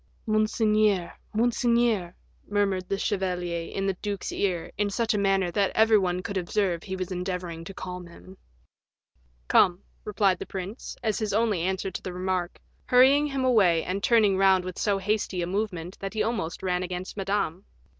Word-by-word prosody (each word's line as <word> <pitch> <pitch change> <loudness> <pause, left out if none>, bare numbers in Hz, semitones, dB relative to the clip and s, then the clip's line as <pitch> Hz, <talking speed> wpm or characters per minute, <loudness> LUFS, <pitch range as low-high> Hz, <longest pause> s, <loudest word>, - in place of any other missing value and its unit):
"Monseigneur, 215 -3 +2 0.2
monseigneur," 235 -4 +1 0.3
murmured 195 -3 0
the 195 - 0
chevalier 180 -4 -2
in 195 - -2
the 195 - +1
duke's 205 -2 -3
ear, 180 -4 -1
in 205 0 0
such 230 +3 0
a - - 0
manner 195 -2 +2
that 195 +2 +2
every 220 -1 +5
one 180 -1 -1
could 200 +1 -3
observe 180 -1 -1
he 190 - -5
was 185 0 -4
endeavoring 180 -2 -4
to 165 - -8
calm 180 -2 -7
him. 185 +2 -14 1.1
"Come," 180 +1 +4 0.2
replied 200 -3 +1
the - - -6
prince, 195 +5 -6
as 215 -3 0
his 215 -3 -2
only 215 -4 +1
answer 190 +2 -1
to - - -6
the 185 - -6
remark, 185 -1 -2 0.3
hurrying 270 +4 +5
him 270 -2 -1
away, 195 -10 +4
and 190 +2 -3
turning 210 -4 +4
round 190 -1 +4
with 185 -1 -6
so 205 -2 +1
hasty 195 -2 -1
a - - 0
movement 185 -2 -3
that 195 +2 -5
he 215 - +1
almost 190 -7 -3
ran 180 -1 0
against 180 0 -5
Madame. 195 -3 -2
195 Hz, 175 wpm, -26 LUFS, 180-215 Hz, 1.1 s, every